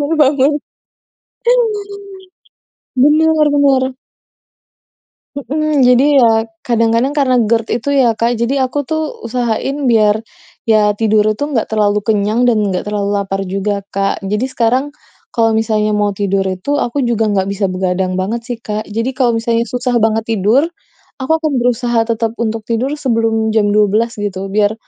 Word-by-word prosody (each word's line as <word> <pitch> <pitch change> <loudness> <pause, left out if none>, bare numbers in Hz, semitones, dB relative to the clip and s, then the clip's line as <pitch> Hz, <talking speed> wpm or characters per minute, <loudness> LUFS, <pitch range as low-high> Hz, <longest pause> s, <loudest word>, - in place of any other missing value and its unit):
baru 290 +3 0
bangun. 280 -1 +3 2.5
Benar 310 +3 +4
benar. 280 -2 +3 1.5
Heeh. 295 +3 -2
Jadi, 270 +3 +4
ya 225 -2 +3 0.2
kadang-kadang 230 +3 +1
karena 265 -3 +2
GERD 225 +1 +1
itu 285 - -3
ya, 260 -5 +3
Kak, 230 +2 -1
jadi 260 +4 0
aku 290 - -4
tuh 315 +2 -1 0.2
usahain 240 +3 -2
biar 215 -1 +3 0.4
ya 215 -2 +3
tidur 215 -1 +3
itu 215 - -7
enggak 235 -6 0
terlalu 210 -1 +1
kenyang 210 +2 0
dan 235 -3 +3
enggak 185 - -2
terlalu 205 -1 -2
lapar 195 0 -3
juga, 195 +2 -2
Kak. 195 0 -2
Jadi 210 +5 -1
sekarang 255 0 0 0.5
kalau 225 -2 +2
misalnya 220 -1 0
mau 205 -1 0
tidur 195 -1 0
itu 190 +11 -2
aku 270 +4 -1
juga 225 -2 0
nggak 200 -2 +1
bisa 200 0 -1
begadang 185 0 -1
banget 215 +5 -2
sih, 245 -2 -4
Kak. 210 0 -4
Jadi, 230 +4 -2
kalau 245 -3 +1
misalnya 230 0 0
susah 250 0 -2
banget 220 0 +1
tidur, 220 +7 +2 0.6
aku 260 - -4
akan 310 -2 -2
berusaha 240 -1 +1
tetap 225 -1 -1
untuk 225 -1 -2
tidur 235 +4 -1
sebelum 225 -4 0
jam 215 -2 +2
12.00 215 +3 +1
gitu, 195 -2 -4
biar 205 +1 +1
225 Hz, 150 wpm, -15 LUFS, 210-255 Hz, 2.5 s, Benar